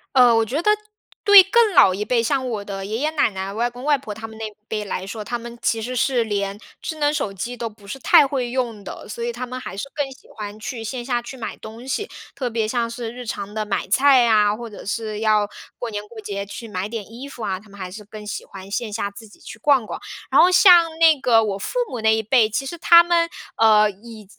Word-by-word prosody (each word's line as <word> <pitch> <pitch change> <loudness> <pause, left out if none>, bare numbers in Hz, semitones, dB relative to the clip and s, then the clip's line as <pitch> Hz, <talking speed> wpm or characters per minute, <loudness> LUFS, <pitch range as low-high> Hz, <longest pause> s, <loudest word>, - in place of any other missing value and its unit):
呃， 245 -2 +7
我 225 0 +3
觉 280 +9 -2
得 420 - +4 0.5
对 405 -2 +10
更 425 +1 +3
老 190 -10 +6
一 205 +3 -3
辈， 235 -1 +1
像 260 +1 0
我 215 -3 -3
的 195 -1 -6
爷 220 +3 -3
爷 305 +2 +1
奶 310 -6 +2
奶、 190 0 -5
外 235 +3 0
公 245 +2 -11
外 295 -1 +3
婆 220 -5 -7
他 220 +1 -8
们 220 - -12
那 220 -1 -4
一 215 - -11 0.2
辈 210 -1 -3
来 185 -1 -4
说， 210 +2 -6
他 240 - -2
们 235 0 -10
其 225 - 0
实 245 +3 -4
是 250 -1 +1
连 200 -2 -2 0.2
智 315 - -5
能 290 0 +2
手 205 -9 -2
机 240 +6 -5
都 235 0 -3
不 210 -2 -19
是 240 +7 -7
太 280 - +6
会 260 -3 -2
用 240 -4 -2
的。 - - -9
所 235 - -6
以 235 0 -2
他 250 +2 -5
们 255 +1 -6
还 195 - -8
是 205 +8 -5
更 285 -2 -2
喜 260 - -22
欢 210 -1 -7
去 225 +2 -6
线 245 +2 -4
下 240 -1 -1
去 250 +3 -9
买 230 - -6
东 225 +3 -10
西， 410 - -3 0.2
特 250 -3 -3
别 225 -1 -1
像 230 +1 -1
是 235 -1 -5
日 245 0 -9
常 205 -2 -5
的 215 0 -2
买 210 - -2
菜 265 +4 +5
呀， 210 -3 +4
或 235 +1 -8
者 210 - -11
是 215 0 -3
要 215 -1 +2 0.3
过 240 - -4
年 205 -1 -3
过 220 0 -10
节 200 -1 -5
去 205 +3 -8
买 190 0 -3
点 220 -1 -7
衣 250 +4 -8
服 250 -5 -9
啊， 190 -3 -2
他 215 - -19
们 200 0 -15
还 185 -2 -6
是 210 +2 -10
更 210 0 -10
喜 205 - -5
欢 195 0 -11
线 215 0 -3
下 200 -2 -2
自 220 +2 -12
己 205 - -19
去 220 - -10
逛 270 -3 +3
逛。 - - -6 0.3
然 - - +6
后 360 - +6
像 345 -3 +6
那 320 -3 +5
个 240 -4 +4
我 200 -2 -2
父 200 - -5
母 245 - -5
那 220 0 +3
一 220 - -1
辈， 220 -1 +3
其 270 +5 -2
实 340 +6 -6
他 340 0 +7
们， 340 -1 +2 0.3
呃， 215 -1 +5
以 215 +2 -13
230 Hz, 285 characters per minute, -22 LUFS, 210-255 Hz, 0.5 s, 对